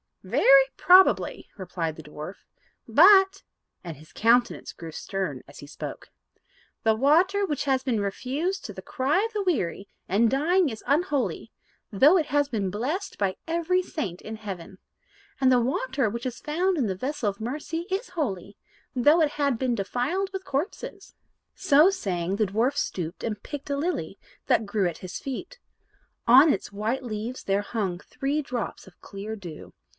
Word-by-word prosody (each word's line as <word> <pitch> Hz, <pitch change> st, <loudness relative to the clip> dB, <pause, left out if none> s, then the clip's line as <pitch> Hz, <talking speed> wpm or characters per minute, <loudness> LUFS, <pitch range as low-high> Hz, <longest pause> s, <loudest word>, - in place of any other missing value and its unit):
"Very 275 Hz, 0 st, +6 dB
probably," 370 Hz, +1 st, +4 dB
replied 175 Hz, -4 st, -4 dB
the 160 Hz, -, -11 dB
dwarf; 150 Hz, +5 st, -8 dB, 0.5 s
"but," 385 Hz, -, +6 dB, 0.4 s
and 165 Hz, -5 st, -7 dB
his 155 Hz, +2 st, -17 dB
countenance 240 Hz, +2 st, +2 dB
grew 165 Hz, -1 st, -9 dB
stern 170 Hz, -6 st, -4 dB
as 140 Hz, -, -13 dB
he 145 Hz, -, -10 dB
spoke, 145 Hz, -, -8 dB, 0.7 s
"the 220 Hz, -1 st, +3 dB
water 340 Hz, -, +3 dB
which 295 Hz, -5 st, -2 dB
has 265 Hz, -2 st, +2 dB
been 245 Hz, -5 st, 0 dB
refused 275 Hz, -, -2 dB
to -, -, -6 dB
the -, -, -9 dB
cry 285 Hz, +9 st, 0 dB
of 455 Hz, +1 st, -3 dB
the 415 Hz, -1 st, -1 dB
weary 200 Hz, -, -1 dB, 0.2 s
and 220 Hz, +5 st, +3 dB
dying 325 Hz, +6 st, +2 dB
is 220 Hz, -3 st, -8 dB
unholy, 290 Hz, -2 st, 0 dB, 0.4 s
though 280 Hz, -, +6 dB
it 315 Hz, -4 st, 0 dB
had 290 Hz, -1 st, +1 dB
been 205 Hz, -5 st, -1 dB
blessed 290 Hz, -, -3 dB
by 195 Hz, -2 st, 0 dB
every 340 Hz, +2 st, +1 dB
saint 200 Hz, -, -5 dB
in 220 Hz, -, -7 dB
heaven; 195 Hz, -4 st, -8 dB, 0.6 s
and 260 Hz, -1 st, +4 dB
the 250 Hz, -, +5 dB
water 260 Hz, +1 st, 0 dB
which 235 Hz, +4 st, -6 dB
is 250 Hz, -1 st, -6 dB
found 355 Hz, +5 st, 0 dB
in 265 Hz, -, +1 dB
the 190 Hz, -3 st, -2 dB
vessel 255 Hz, +1 st, -2 dB
of 200 Hz, -, -7 dB
mercy 305 Hz, +8 st, -4 dB
is 385 Hz, +5 st, -2 dB
holy, 200 Hz, -, -4 dB, 0.4 s
though 295 Hz, +7 st, +5 dB
it 300 Hz, -2 st, +2 dB
had 280 Hz, -4 st, 0 dB
been 255 Hz, 0 st, 0 dB
defiled 265 Hz, -, -2 dB
with 380 Hz, 0 st, -5 dB
corpses." 380 Hz, +6 st, -4 dB, 0.4 s
So 300 Hz, +6 st, +5 dB
saying, 190 Hz, -, -2 dB
the 215 Hz, 0 st, +1 dB
dwarf 230 Hz, +8 st, +1 dB
stooped 175 Hz, -, -3 dB
and 215 Hz, -2 st, -3 dB
plucked 290 Hz, -1 st, -7 dB
a 280 Hz, -, 0 dB
lily 345 Hz, +5 st, -3 dB, 0.3 s
that 220 Hz, -, +3 dB
grew 200 Hz, -2 st, +1 dB
at 170 Hz, -, -5 dB
his 185 Hz, -1 st, -7 dB
feet. 355 Hz, -, -6 dB, 0.7 s
On 270 Hz, +6 st, +8 dB
its 195 Hz, -, -5 dB
white 220 Hz, +6 st, -2 dB
leaves 230 Hz, +2 st, -5 dB
there 195 Hz, +1 st, +1 dB
hung 195 Hz, -5 st, -3 dB
three 295 Hz, +6 st, -3 dB
drops 245 Hz, -3 st, -5 dB
of 190 Hz, -, -18 dB
clear 205 Hz, +2 st, -7 dB
dew. 175 Hz, -7 st, -10 dB
255 Hz, 170 wpm, -26 LUFS, 200-310 Hz, 0.7 s, On